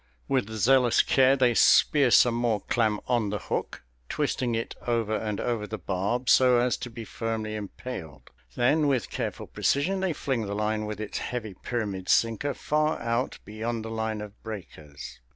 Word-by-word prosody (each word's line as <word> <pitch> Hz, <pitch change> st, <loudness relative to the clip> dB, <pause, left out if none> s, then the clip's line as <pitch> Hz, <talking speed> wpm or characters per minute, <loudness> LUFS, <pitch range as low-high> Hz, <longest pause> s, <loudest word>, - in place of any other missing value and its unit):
With 130 Hz, -6 st, 0 dB
zealous 120 Hz, +3 st, +3 dB
care 135 Hz, 0 st, +4 dB
they 125 Hz, -3 st, +3 dB
spear 140 Hz, +3 st, +5 dB
some 120 Hz, 0 st, +6 dB
more 115 Hz, -3 st, 0 dB
clam 110 Hz, -4 st, 0 dB
on 120 Hz, -4 st, +1 dB
the 105 Hz, -, -2 dB
hook, -, -, -4 dB, 0.3 s
twisting 130 Hz, -5 st, -1 dB
it 115 Hz, -, -3 dB
over 115 Hz, -2 st, 0 dB
and 105 Hz, -2 st, -3 dB
over 115 Hz, -4 st, -2 dB
the 110 Hz, -, -5 dB
barb 100 Hz, +7 st, -2 dB
so 125 Hz, -1 st, +6 dB
as 120 Hz, +1 st, +2 dB
to 125 Hz, -, -6 dB
be 115 Hz, 0 st, -8 dB
firmly 110 Hz, -1 st, -4 dB
impaled. 100 Hz, -, -8 dB, 0.2 s
Then, 150 Hz, +5 st, +3 dB
with 130 Hz, -4 st, 0 dB
careful -, -, -4 dB
precision, 180 Hz, +8 st, 0 dB
they 190 Hz, -3 st, 0 dB
fling 130 Hz, -7 st, -2 dB
the 100 Hz, -, -3 dB
line 105 Hz, 0 st, -1 dB
with 105 Hz, -1 st, -5 dB
its 110 Hz, -1 st, -4 dB
heavy 110 Hz, -5 st, -4 dB
pyramid 100 Hz, -3 st, -4 dB
sinker 115 Hz, +5 st, +2 dB
far 155 Hz, +1 st, 0 dB
out 120 Hz, +2 st, -1 dB
beyond 110 Hz, +1 st, -4 dB
the 110 Hz, -, -6 dB
line 110 Hz, -1 st, -2 dB
of 105 Hz, 0 st, -10 dB
breakers. 80 Hz, -9 st, -9 dB
115 Hz, 170 wpm, -27 LUFS, 105-125 Hz, 0.3 s, some